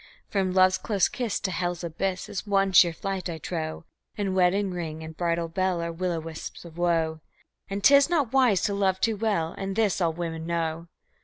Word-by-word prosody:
From 190 Hz, -2 st, 0 dB
love's 185 Hz, 0 st, +4 dB
close 200 Hz, -5 st, +1 dB
kiss 240 Hz, -5 st, -2 dB
to 190 Hz, -, -1 dB
hell's 175 Hz, 0 st, -2 dB
abyss 180 Hz, +3 st, -2 dB
is 200 Hz, -, -5 dB
one 195 Hz, -1 st, +2 dB
sheer 175 Hz, -2 st, +7 dB
flight, 190 Hz, +2 st, -4 dB
I 165 Hz, -, -4 dB
trow, 160 Hz, 0 st, -5 dB, 0.3 s
And 195 Hz, -2 st, -1 dB
wedding 190 Hz, +2 st, +2 dB
ring 160 Hz, -3 st, -5 dB
and 160 Hz, 0 st, -8 dB
bridal 170 Hz, 0 st, 0 dB
bell 185 Hz, +1 st, 0 dB
are 170 Hz, 0 st, -2 dB
will 180 Hz, +2 st, -2 dB
o' 165 Hz, -, -2 dB
wisps 160 Hz, +1 st, -8 dB
of 165 Hz, -2 st, -12 dB
woe, 165 Hz, -2 st, 0 dB, 0.5 s
And 200 Hz, 0 st, -4 dB
'tis 280 Hz, +1 st, +7 dB
not 295 Hz, -9 st, +1 dB
wise 250 Hz, -8 st, +4 dB
to 205 Hz, -, +1 dB
love 190 Hz, -2 st, +1 dB
too 225 Hz, +1 st, +1 dB
well, 200 Hz, -6 st, -1 dB
and 195 Hz, 0 st, -3 dB
this 210 Hz, -4 st, +1 dB
all 170 Hz, -2 st, +2 dB
women 165 Hz, -1 st, -5 dB
know. 165 Hz, 0 st, -2 dB
180 Hz, 205 wpm, -26 LUFS, 165-195 Hz, 0.5 s, sheer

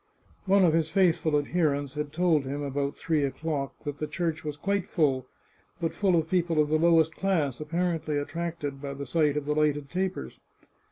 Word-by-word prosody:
One 195 Hz, 0 st, +5 dB
of 165 Hz, -, +4 dB
his 160 Hz, -1 st, +1 dB
faithful 165 Hz, -4 st, +3 dB
ad 145 Hz, -, -2 dB
herents 145 Hz, -5 st, 0 dB
had 150 Hz, 0 st, -4 dB
told 165 Hz, -2 st, +2 dB
him, 140 Hz, +2 st, -4 dB
about 140 Hz, 0 st, -2 dB
three 155 Hz, -3 st, 0 dB
o'clock, 140 Hz, 0 st, -2 dB
that 145 Hz, -1 st, -4 dB
the 150 Hz, -, -3 dB
church 165 Hz, +1 st, -2 dB
was 150 Hz, -1 st, -4 dB
quite 200 Hz, +3 st, -1 dB
full, 135 Hz, -5 st, +1 dB, 0.5 s
but 165 Hz, -2 st, -1 dB
full 195 Hz, -3 st, +2 dB
of 160 Hz, -1 st, +1 dB
people 170 Hz, -3 st, +1 dB
of 150 Hz, -1 st, +3 dB
the 155 Hz, 0 st, +2 dB
lowest 160 Hz, -1 st, +4 dB
class, 160 Hz, -10 st, 0 dB
appar 170 Hz, +2 st, -1 dB
ently 150 Hz, -2 st, -2 dB
attracted 155 Hz, -2 st, -4 dB
by 140 Hz, -1 st, -5 dB
the 140 Hz, 0 st, -5 dB
sight 150 Hz, +2 st, +1 dB
of 150 Hz, -, -2 dB
the 150 Hz, -, 0 dB
lighted 150 Hz, -2 st, 0 dB
tapers. 180 Hz, -, -3 dB
155 Hz, 200 wpm, -28 LUFS, 145-170 Hz, 0.5 s, One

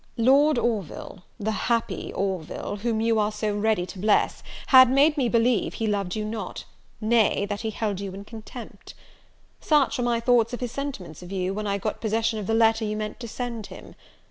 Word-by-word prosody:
"Lord 275 Hz, +5 st, +4 dB
Orville, 200 Hz, -5 st, -3 dB
the 215 Hz, +1 st, -1 dB
happy 230 Hz, +2 st, -1 dB
Orville, 190 Hz, 0 st, -3 dB
whom 220 Hz, +1 st, -1 dB
you 225 Hz, -1 st, +2 dB
are 210 Hz, 0 st, +1 dB
so 210 Hz, 0 st, -2 dB
ready 210 Hz, -3 st, +1 dB
to 185 Hz, -, -10 dB
bless, 210 Hz, +2 st, +2 dB, 0.3 s
had 260 Hz, -2 st, +9 dB
made 285 Hz, +4 st, +4 dB
me 260 Hz, -6 st, +1 dB
believe 230 Hz, -2 st, +2 dB
he 225 Hz, -, -2 dB
loved 200 Hz, -4 st, -1 dB
you 215 Hz, -1 st, -2 dB
not; 215 Hz, -3 st, -5 dB, 0.3 s
nay, 220 Hz, -2 st, +2 dB
that 205 Hz, 0 st, -4 dB
he 220 Hz, -, -2 dB
held 210 Hz, -3 st, -2 dB
you 200 Hz, -1 st, -5 dB
in 200 Hz, +1 st, -9 dB
contempt. 225 Hz, +2 st, -10 dB, 0.6 s
"Such 295 Hz, -4 st, +2 dB
were -, -, 0 dB
my 240 Hz, -1 st, +1 dB
thoughts 235 Hz, 0 st, +3 dB
of 245 Hz, -, -3 dB
his 245 Hz, -2 st, -3 dB
sentiments 225 Hz, -, -6 dB
of 180 Hz, +1 st, -10 dB
you, 190 Hz, -1 st, -1 dB
when 210 Hz, +1 st, -3 dB
I 200 Hz, 0 st, 0 dB
got 210 Hz, +2 st, -4 dB
possession 220 Hz, 0 st, 0 dB
of 200 Hz, -, -5 dB
the 225 Hz, -, +1 dB
letter 225 Hz, 0 st, +3 dB
you 215 Hz, 0 st, -2 dB
meant 215 Hz, +2 st, -5 dB
to 235 Hz, -, -6 dB
send 235 Hz, -2 st, -5 dB
him. -, -, -12 dB
220 Hz, 200 wpm, -25 LUFS, 205-235 Hz, 0.6 s, had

